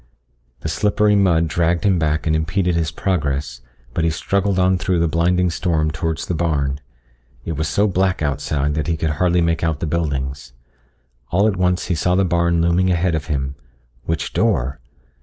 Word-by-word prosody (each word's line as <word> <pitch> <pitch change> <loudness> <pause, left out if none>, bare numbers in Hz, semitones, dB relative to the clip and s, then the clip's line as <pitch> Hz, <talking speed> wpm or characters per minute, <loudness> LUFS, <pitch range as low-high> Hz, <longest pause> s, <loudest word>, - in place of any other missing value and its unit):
The - - -4
slippery 105 0 +2
mud 85 -5 +3
dragged 85 0 0
him 95 -4 +3
back 75 -1 0
and 80 -1 +2
impeded 85 +3 0
his 85 -2 0
progress, 75 -8 -2 0.3
but 80 - -1
he 85 - +3
struggled 100 +4 0
on 95 0 +3
through 90 -1 0
the 85 0 +2
blinding 90 +2 +1
storm 80 -3 0
towards 80 -1 -3
the - - -2
barn. 70 -5 -1 0.7
It - - -3
was 80 0 -2
so 100 +8 +2
black 95 0 +1
outside 75 0 -1
that 75 0 -2
he 85 -1 0
could 80 0 -1
hardly 90 -1 +3
make 85 0 0
out 80 -3 0
the - - -2
buildings. 70 -5 -3 0.8
All 100 +4 +2
at 105 - +1
once 90 -1 +1
he - - -1
saw 90 +2 +1
the 95 +1 +3
barn 85 -1 +1
looming 85 +2 +2
ahead 90 0 +1
of 80 -1 -2
him. 70 -3 -2 0.5
Which 80 0 -2
door? 65 +3 0
85 Hz, 185 wpm, -20 LUFS, 75-90 Hz, 0.8 s, mud